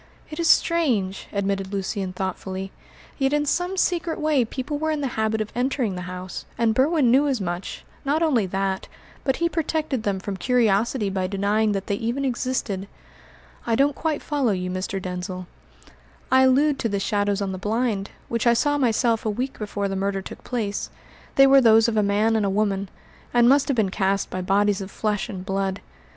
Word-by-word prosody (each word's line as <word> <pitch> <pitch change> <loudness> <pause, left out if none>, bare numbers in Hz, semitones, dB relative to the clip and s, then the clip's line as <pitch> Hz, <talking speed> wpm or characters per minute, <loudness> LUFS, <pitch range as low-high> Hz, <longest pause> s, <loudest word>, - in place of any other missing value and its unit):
"It 305 - -6
is 335 -1 +2
strange," 235 - +2
admitted 195 -1 -2
Lucian 195 -1 -2
thoughtfully, 190 +1 -4 0.5
"yet 270 +1 +2
in 295 0 +2
some 355 +5 0
secret 345 -3 0
way 305 -4 +2
people 260 +5 -4
were 315 +1 -1
in 305 -2 -1
the 275 - -1
habit 220 0 0
of 215 - -4
entering 245 -4 0
the 180 - -5
house, 185 0 -7
and 230 -1 +2
Berwin 270 0 +3
knew 275 +4 +4
as 265 -4 0
much; 180 -1 -5 0.2
not 295 +4 +1
only 250 -11 +2
that, 190 0 -2 0.4
but 265 -1 +1
he 335 - +1
protected 310 -5 -1
them 200 -3 -1
from 195 0 -5
curiosity 225 0 +1
by 190 -1 -1
denying 205 +2 +1
that 195 -1 -3
they - - -1
even 240 +6 -2
existed." 240 -6 -2 0.8
"I 230 - +2
don't 280 +4 +3
quite 315 -3 -2
follow 275 -7 +1
you, 180 -1 -3
Mr. 185 +1 -3
Denzil." 180 0 -5 0.9
"I 260 0 +6
allude 275 +3 +3
to 230 - 0
the 200 -1 -1
shadows 205 0 0
on 200 -1 -2
the 185 - -5
blind, 210 -1 -1 0.2
which 230 0 -1
I 235 - +5
saw 290 +4 +1
myself 230 -2 +2
a 220 - 0
week 250 +6 -3
before 205 -1 -2
the 195 - -3
murder 195 0 -1
took - - -10
place. 215 -5 -3 0.5
They 275 - +8
were 275 0 +7
those 225 -1 +6
of 230 - -1
a 215 - +4
man 210 +2 +2
and 220 - +2
a 200 - +1
woman, 200 -1 0 0.5
and 240 0 +6
must 275 +1 +4
have 275 - 0
been 200 -4 +2
cast 195 0 0
by 185 - -3
bodies 200 +2 +2
of 190 - -6
flesh 210 +2 -2
and 190 -4 -6
blood. 195 -1 -1
220 Hz, 195 wpm, -24 LUFS, 195-265 Hz, 0.9 s, They